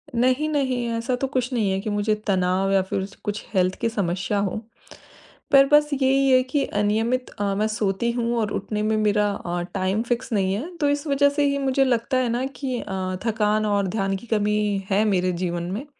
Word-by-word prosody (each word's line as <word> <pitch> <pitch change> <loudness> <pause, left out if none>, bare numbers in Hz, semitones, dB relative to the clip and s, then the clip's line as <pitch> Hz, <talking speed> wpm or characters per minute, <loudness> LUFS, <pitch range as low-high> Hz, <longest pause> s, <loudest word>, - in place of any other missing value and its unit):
नहीं, 255 +5 +2
नहीं 260 -5 0
ऐसा 235 +2 -1
तो 270 - +1
कुछ 255 -1 -2
नहीं 215 -5 +1
है 190 - 0
कि 215 - -4
मुझे 205 +1 +1
तनाव 190 0 +1
या 195 -1 +4
फिर 190 0 -3
स 200 - -14
कुछ 205 0 -4
हेल्थ 185 -1 +2
की 230 - +1
समस्या 195 -1 -1
हो। 200 -2 -1 1.0
पर 275 0 +7
बस 295 0 +5
यही 270 0 +2
है 255 0 +6
कि 275 +2 -1
अनियमित 225 +5 0
अ, 205 - -6
मैं 215 +2 +1
सोती 215 +2 -1
हूँ 235 0 -1
और 210 -2 -1
उठने 210 +2 -3
में 220 +1 +1
मेरा 210 -1 +2
अ, 175 -2 -4
टाइम 190 +2 0
फिक्स 240 0 -1
नहीं 195 -2 +1
है 315 - -5
तो 290 - +3
इस 290 +1 -1
वजह 285 0 +4
से 290 0 0
ही 280 - 0
मुझे 270 -1 +2
लगता 255 +1 +1
है 250 -2 +1
ना 240 +3 -1
कि 260 -4 -2
अ, 185 -1 -3
थकान 215 -1 +1
और 200 -2 +1
ध्यान 195 0 -1
की 195 +5 -9
कमी 210 -2 +1
है 205 +3 +3
मेरे 185 -3 +1
जीवन 175 0 -3
में। 225 +9 -4
215 Hz, 215 wpm, -23 LUFS, 195-255 Hz, 1.0 s, पर